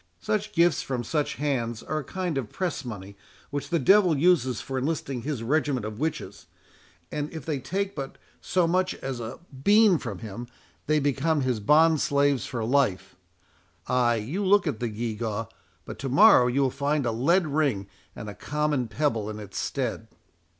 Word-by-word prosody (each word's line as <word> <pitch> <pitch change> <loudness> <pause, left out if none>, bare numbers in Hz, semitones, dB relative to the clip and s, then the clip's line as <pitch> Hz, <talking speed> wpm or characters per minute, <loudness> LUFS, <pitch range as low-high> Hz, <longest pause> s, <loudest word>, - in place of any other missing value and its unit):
Such 210 0 -1
gifts 170 -1 +3
from 125 -3 -3
such 150 +3 -1
hands 120 -6 -2
are 155 - -2
a - - -5
kind 180 +2 -3
of 115 -6 -6
press 175 -6 -3
money 100 -5 -8 0.4
which 145 0 -4
the 170 - +2
devil 180 +2 +5
uses 135 - +3
for 135 -1 -4
enlisting 135 -3 -2
his 135 -3 -4
regiment 135 -2 0
of 110 +1 -6
witches; 160 +1 -4 0.6
and 150 0 -3
if 160 -5 -8
they 150 -4 -2
take 195 +8 -2
but 135 -3 -6 0.2
so 180 -1 +1
much 185 +2 +1
as 135 -2 -5
a 115 +1 -6 0.3
bean 210 -4 +5
from 105 -6 -5
him, 110 +4 -7 0.4
they 155 0 +3
become 145 +2 +1
his 130 -4 0
bond 155 +7 +4
slaves 140 -3 +1
for 115 -3 -3
life—Ay, 95 0 -1
you 135 - -3
look 200 +1 +4
at 145 -9 -2
the 120 - -2
gew 110 +1 -3
gaw, 115 -1 -3 0.4
but - - -8
to 135 - -3
morrow 135 - +7
you 130 +3 +1
will 130 - +1
find 140 +1 -1
a 120 - +1
lead 165 +11 +2
ring, 140 -9 0 0.3
and 105 - -7
a 105 - -6
common 145 +3 -1
pebble 115 -4 -1
in 105 - -6
its 105 -2 -7
stead." - - -3
135 Hz, 180 wpm, -26 LUFS, 115-155 Hz, 0.6 s, morrow